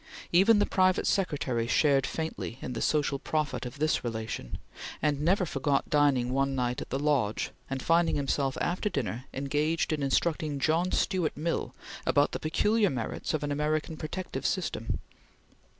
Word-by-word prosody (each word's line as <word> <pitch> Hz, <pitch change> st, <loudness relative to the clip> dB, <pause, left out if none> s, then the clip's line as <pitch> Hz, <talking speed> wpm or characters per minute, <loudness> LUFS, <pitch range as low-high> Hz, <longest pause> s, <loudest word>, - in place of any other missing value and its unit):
Even 195 Hz, +6 st, +6 dB
the 205 Hz, -, +3 dB
private 185 Hz, -1 st, +2 dB
secretary 140 Hz, -11 st, 0 dB
shared 135 Hz, 0 st, +3 dB
faintly 160 Hz, -7 st, -4 dB
in 125 Hz, -, -5 dB
the -, -, -4 dB
social 145 Hz, -2 st, +1 dB
profit 150 Hz, -3 st, -2 dB
of 125 Hz, +3 st, -10 dB
this 155 Hz, +2 st, +1 dB
relation, 110 Hz, -, -4 dB, 0.4 s
and 150 Hz, -2 st, 0 dB
never 180 Hz, +4 st, +3 dB
forgot 140 Hz, -2 st, 0 dB
dining 140 Hz, -4 st, +3 dB
one 135 Hz, 0 st, +1 dB
night 125 Hz, -1 st, -1 dB
at -, -, -7 dB
the 135 Hz, -, -1 dB
Lodge, 140 Hz, -8 st, 0 dB, 0.2 s
and 135 Hz, -1 st, -3 dB
finding 165 Hz, 0 st, +3 dB
himself 135 Hz, -1 st, 0 dB
after 185 Hz, +4 st, 0 dB
dinner 130 Hz, -, -3 dB
engaged 150 Hz, +4 st, 0 dB
in 150 Hz, -, -2 dB
instructing 150 Hz, +1 st, 0 dB
John 160 Hz, +6 st, +1 dB
Stuart 180 Hz, -6 st, 0 dB
Mill 165 Hz, +3 st, -2 dB, 0.3 s
about 145 Hz, 0 st, +3 dB
the -, -, -3 dB
peculiar 210 Hz, +6 st, +2 dB
merits 125 Hz, +4 st, -3 dB
of 150 Hz, -, -3 dB
an 145 Hz, -, -2 dB
American 150 Hz, +2 st, -1 dB
protective 175 Hz, +4 st, -5 dB
system. 165 Hz, -, -1 dB
150 Hz, 160 wpm, -29 LUFS, 135-165 Hz, 0.4 s, Even